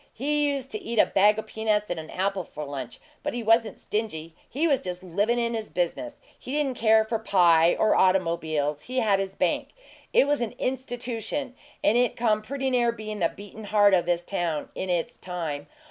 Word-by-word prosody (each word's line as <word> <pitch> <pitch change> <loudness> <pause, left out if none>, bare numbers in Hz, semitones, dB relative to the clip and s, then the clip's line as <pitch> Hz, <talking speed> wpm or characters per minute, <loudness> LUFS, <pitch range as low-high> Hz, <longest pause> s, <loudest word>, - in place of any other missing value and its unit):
He 295 +3 +1
used 270 -1 -4
to 215 - -4
eat 230 0 -5
a - - +7
bag 210 +2 +4
o' 220 - -3
peanuts 215 -2 -1
and 175 - -2
an 155 - -9
apple 190 0 -1
for 150 - -8
lunch; 140 -4 -6 0.2
but - - -3
he 240 - -3
wasn't 225 0 +3
stingy 165 -7 -4 0.2
he 305 +6 0
was 280 -5 +3
just 180 0 -6
livin' 200 +7 0
in 235 0 0
his 220 -2 -4
business. 280 - -3 0.2
He 255 - -7
didn't 290 -3 0
care 220 -1 +5
for 225 0 -2
pie 170 -5 +4
or 215 - +3
automobiles 165 -5 +1
he 255 +1 -6
had 210 -5 +3
his 195 0 -3
bank. - - -1 0.4
It - - +5
was 290 -2 +1
an 235 - -3
institution, 255 +1 -3 0.3
and 230 +3 +4
it 245 -1 +1
come 215 -2 +1
pretty 265 +4 -3
near 240 -2 +3
bein' 215 -2 -6
the 165 -2 +2
beatin' 205 +2 -11
heart 205 -1 +4
o' 180 - +5
this 175 0 -1
town 175 -5 -2
in 190 - -4
its 180 +7 -1
time. 160 -5 -5
215 Hz, 205 wpm, -26 LUFS, 175-240 Hz, 0.4 s, a